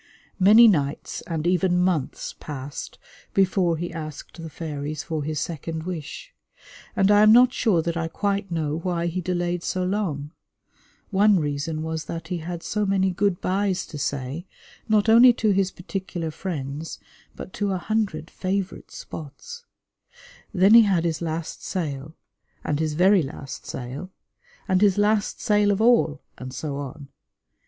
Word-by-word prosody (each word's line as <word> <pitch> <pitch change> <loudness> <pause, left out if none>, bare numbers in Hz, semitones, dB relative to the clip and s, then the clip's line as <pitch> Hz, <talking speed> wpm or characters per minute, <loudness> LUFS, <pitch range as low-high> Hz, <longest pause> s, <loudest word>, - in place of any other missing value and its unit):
Many 215 +5 +8
nights 145 -8 0
and 160 -2 -3
even 180 0 +2
months 180 -6 -1
passed 140 -1 -7 0.4
before 185 -3 +2
he 175 +2 -4
asked 155 +1 -8
the 165 - -7
fairies 150 -1 -5
for 160 -3 -3
his 155 0 -2
second 160 0 -4
wish; 180 - -7 0.6
and 195 0 +4
I 205 0 +6
am 215 0 +7
not 250 +2 +7
sure 185 -9 +2
that 170 0 -2
I 165 -1 -1
quite 200 +3 -2
know 160 -2 -2
why 170 -1 -1
he 175 +2 -2
delayed 175 0 -1
so 185 +1 -2
long. 180 -7 -2 0.8
One 200 0 +4
reason 150 +1 -2
was 160 0 -3
that 165 0 -6
he 180 - -2
had 170 +1 -6
so 210 0 -1
many 195 -1 +2
good 190 0 0
byes 190 0 0
to 150 - -8
say, 140 +6 -3 0.4
not 215 0 +3
only 240 +3 +8
to 220 -2 +1
his 195 -1 +2
particular 180 -3 -5
friends, 150 -3 -5 0.4
but - - -9
to 205 -1 -1
a 190 - 0
hundred 190 -5 -2
favourite 190 0 -3
spots. 470 - -9 0.9
Then 195 +1 +5
he 230 - +10
had 190 -6 +2
his 160 -1 -1
last 165 0 -4
sail, 155 -4 -4 0.5
and 145 -1 -1
his 155 -1 -1
very 190 +3 +5
last 135 -2 -7
sail, 130 +8 -6 0.6
and 185 -1 +2
his 205 -2 +4
last 210 0 +1
sail 210 -3 +3
of 200 0 +1
all, 225 -10 +3 0.2
and 130 0 -7
so 140 +2 -4
on. 140 0 -7
175 Hz, 160 wpm, -24 LUFS, 155-195 Hz, 0.9 s, he